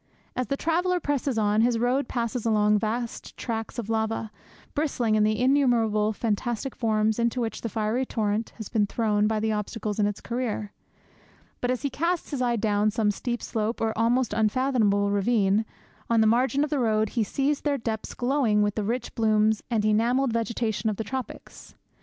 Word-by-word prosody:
As 255 - -1
the 275 - -1
traveller 355 +4 +1
presses 280 -5 -1
on, 210 0 +2
his 235 0 +3
road 245 +3 +1
passes 235 -1 -2
along 210 -2 +3
vast 230 +2 -4
tracts 225 -1 -4
of 235 -4 -4
lava, 220 -1 -1 0.4
bristling 265 -7 0
in 215 - +3
the 215 0 +1
innumerable 240 -5 +3
fantastic 235 +4 -2
forms 220 -1 +1
into 235 +1 +1
which 230 -2 -3
the 230 - -3
fiery 220 +4 0
torrent 215 -3 -1
has 220 -3 -6
been 210 -3 +1
thrown 210 -1 +1
by 220 0 0
the 220 +1 0
obstacles 210 0 -3
in 205 - +3
its 205 - -3
career. 235 -4 -3 0.9
But 245 - 0
as 255 +2 -1
he 280 - -1
casts 340 +3 -1
his 275 -3 -2
eye 240 -1 +2
down 210 -1 +1
some 215 -1 +1
steep 240 +3 -4
slope, 220 +1 -2
or 220 -1 0
almost 235 +1 +1
unfathomable 215 -2 +2
ravine, 205 0 +2 0.4
on 230 -1 +3
the 220 - +5
margin 255 +5 +3
of 300 - -3
the 295 - +1
road, 220 -3 +2
he 230 0 0
sees 275 +6 0
their 290 -2 0
depths 225 -3 -4
glowing 245 -5 +2
with 205 -1 0
the 215 - -2
rich 240 +4 -3
blooms 215 -1 +2
and 220 -3 +1
enamelled 235 +4 +2
vegetation 225 -2 -1
of 210 - -2
the 220 - -3
tropics. 260 +4 -7
225 Hz, 185 wpm, -26 LUFS, 215-250 Hz, 0.9 s, the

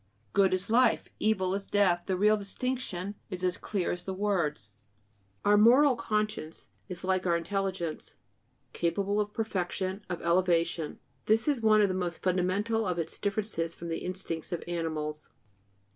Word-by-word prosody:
Good 195 -1 +4
is 185 +1 0
life; 250 +2 +3
evil 190 -4 +1
is 195 0 -3
death; 185 -4 +2
the 190 -2 0
real 210 +3 +5
distinction 205 -2 -3 0.2
is 185 -2 -4
as 180 0 +1
clear 200 -3 -2
as 180 0 -4
the 190 - -4
words. 170 - -1 0.7
Our 205 0 +6
moral 255 +6 +6
conscience 215 -8 -3 0.2
is, 180 -1 -6
like 185 0 0
our 170 -1 +3
intelligence, 185 -2 -3 0.6
capable 195 +4 0
of 210 0 -3
perfection, 190 -2 -2
of 175 - -3
elevation; 170 -2 +1 0.3
this 220 +4 +2
is 285 -5 +1
one 215 -1 +5
of - - +4
the 185 - -1
most 180 -2 -3
fundamental 190 +4 +1
of 180 -1 -1
its 165 -1 -2
differences 200 -5 -1
from 170 - -7
the 165 - -2
instincts 180 -2 -4
of 175 - -3
animals. 155 -3 -3
185 Hz, 160 wpm, -29 LUFS, 175-210 Hz, 0.7 s, Our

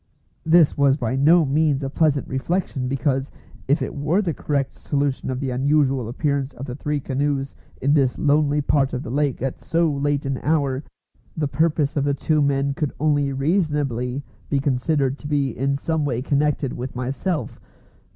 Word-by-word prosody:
This 160 -2 +5
was 140 -1 +3
by 125 -2 -1
no 155 +5 +5
means 145 0 +1
a 135 - -2
pleasant 145 -2 +1
reflection, 135 -1 -2
because, 135 0 0 0.4
if 145 +4 +2
it - - -4
were 150 +6 +1
the 170 -4 -1
correct 140 -2 -2
solution 140 -2 -2
of 130 -1 -2
the 135 -2 -2
unusual 135 -1 +1
appearance 140 +2 -1
of 135 - -7
the 125 - -6
three 150 +1 -2
canoes 140 0 -1 0.3
in 140 +2 +2
this 135 -4 +2
lonely 150 0 +2
part 140 -1 +1
of 130 +1 -3
the - - -6
lake 140 -2 0
at 135 - -3
so 165 -1 +1
late 145 0 -1
an 135 -1 -2
hour, 140 -3 0 0.5
the 150 -2 0
purpose 150 -1 +1
of 145 - +1
the 140 0 +1
two 155 +2 +1
men 140 0 +1
could 145 0 -2
only 145 -2 +2
reasonably 140 - 0 0.3
be 140 - +1
considered 135 0 0
to 145 - -7
be 140 -4 0
in 135 +3 0
some 160 +2 -1
way 125 -4 -1
connected 145 -1 0
with 125 +1 -6
myself. 135 +7 -3
140 Hz, 180 wpm, -22 LUFS, 135-150 Hz, 0.5 s, This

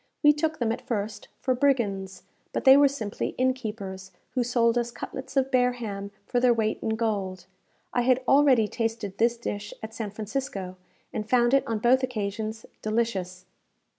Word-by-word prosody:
We 295 0 +8
took 310 +1 -1
them, 230 -2 0
at 230 - -3
first, 215 -2 -4
for 260 - +2
brigands; 215 -8 0 0.3
but - - -1
they 265 0 +9
were 285 0 +7
simply 230 -7 -4
inn 260 0 +3
keepers, 200 -6 -6 0.2
who 250 - +1
sold 235 -1 +2
us 240 -1 0
cutlets 265 +3 -7
of 270 0 +2
bear 250 -1 +3
ham 200 -5 -5 0.2
for 245 - 0
their 245 -1 +4
weight 220 -1 0
in 220 - 0
gold. 195 -5 -2 0.5
I 245 - +2
had 255 +1 +3
already 270 -6 +5
tasted 225 -3 -3
this 235 +1 +3
dish 210 -3 -5
at 220 0 -6
San 220 -2 -4
Francisco, 210 -3 -4 0.4
and 215 0 -4
found 240 0 +4
it 275 - +3
on 225 - 0
both 245 +4 +4
occasions 220 -2 -3 0.2
delicious. 195 -5 -2
230 Hz, 175 wpm, -27 LUFS, 210-255 Hz, 0.5 s, they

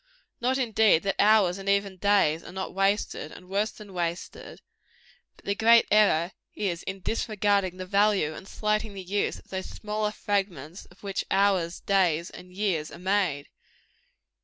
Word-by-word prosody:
Not, 255 +2 +1
indeed, 220 -8 +3
that 195 0 -1
hours 205 -3 +4
and 195 0 -4
even 200 -1 +1
days 185 -5 +2
are - - -10
not 190 +1 -5
wasted, 195 -5 0
and 180 - -13
worse 200 +3 0
than 210 -3 -13
wasted; 170 -1 -5 0.8
but - - -23
the 200 - +1
great 230 +2 +5
error 195 -5 +4 0.2
is, 180 -4 -2
in 190 0 -6
disregarding 205 -3 0
the 185 - -5
value 200 -4 +2
and 190 - -10
slighting 215 0 -1
the 190 - -6
use 200 +3 -1
of - - -18
those 190 -1 -4
smaller 210 0 -3
fragments 190 -6 -3
of 180 - -22
which 195 -1 -2
hours, 190 -3 +1
days 175 -4 +1
and 180 0 -12
years 180 -5 -1
are - - -11
made. 180 -6 0
195 Hz, 160 wpm, -27 LUFS, 180-210 Hz, 0.8 s, great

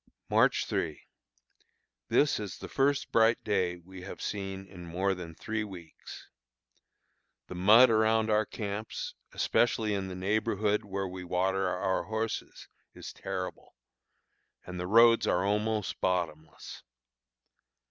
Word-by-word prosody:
March - - +3
3. 80 -2 -2 1.1
This 145 -5 +3
is 105 -3 -6
the - - -8
first 140 +1 +1
bright 115 0 +3
day 90 -4 0
we 95 +2 -12
have 95 - -8
seen 95 -1 -4
in 90 -2 -12
more 95 +3 0
than 85 -3 -8
three 110 +4 -3
weeks. 90 -6 -11 1.2
The - - -9
mud 110 +7 +7
around 110 0 +3
our 105 0 +2
camps, 105 +1 -5 0.2
especially 115 -3 +1
in 95 -1 -2
the 95 - -6
neighborhood 105 +2 0
where 100 -1 -3
we 90 0 -7
water 95 +1 0
our 95 +1 -1
horses, 110 +1 -4 0.3
is - - -8
terrible, 95 -1 -6 0.9
and 90 0 -7
the 90 - -3
roads 115 +1 +6
are 90 +2 +2
almost 105 +1 -1
bottomless. 80 -4 -3
100 Hz, 125 wpm, -30 LUFS, 90-110 Hz, 1.2 s, mud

